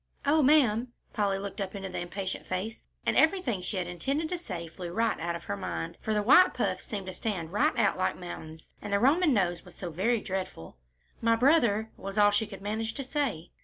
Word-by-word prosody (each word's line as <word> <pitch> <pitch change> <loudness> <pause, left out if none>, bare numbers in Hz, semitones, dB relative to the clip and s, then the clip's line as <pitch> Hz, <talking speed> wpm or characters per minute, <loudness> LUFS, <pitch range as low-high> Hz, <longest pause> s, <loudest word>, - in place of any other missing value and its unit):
"Oh, 305 +2 +4
ma'am," 255 -5 +4 0.2
Polly 200 -3 +1
looked 200 +1 -5
up 195 +1 -4
into 195 -1 -4
the 185 - -4
impatient 190 +2 -4
face, 190 +5 -4 0.2
and - - +1
everything 315 - +3
she 185 +3 -3
had 180 - -1
intended 275 - -2
to 360 - -1
say 170 - -6
flew 170 +1 -7
right 225 +4 0
out 170 +1 -2
of 170 - -7
her - - -3
mind, 85 -4 -4
for 220 - -2
the 210 -1 +1
white 360 - +6
puffs - - -1
seemed 205 -7 -4
to 185 - -5
stand 180 -7 -3
right 210 - +2
out 200 -4 +2
like 185 - 0
mountains, 160 -3 -9
and 205 - -6
the 200 - +3
Roman 300 - +4
nose 180 -7 +1
was - - -15
so 175 -2 -6
very 220 +8 +1
dreadful. 185 - -5 0.4
"My 230 0 +4
brother," 230 -5 +3
was 195 +1 -7
all 205 0 +6
she 205 +1 +1
could 195 -2 -10
manage 220 +2 -2
to 275 - -3
say. 255 - -2
205 Hz, 220 wpm, -29 LUFS, 180-235 Hz, 0.4 s, white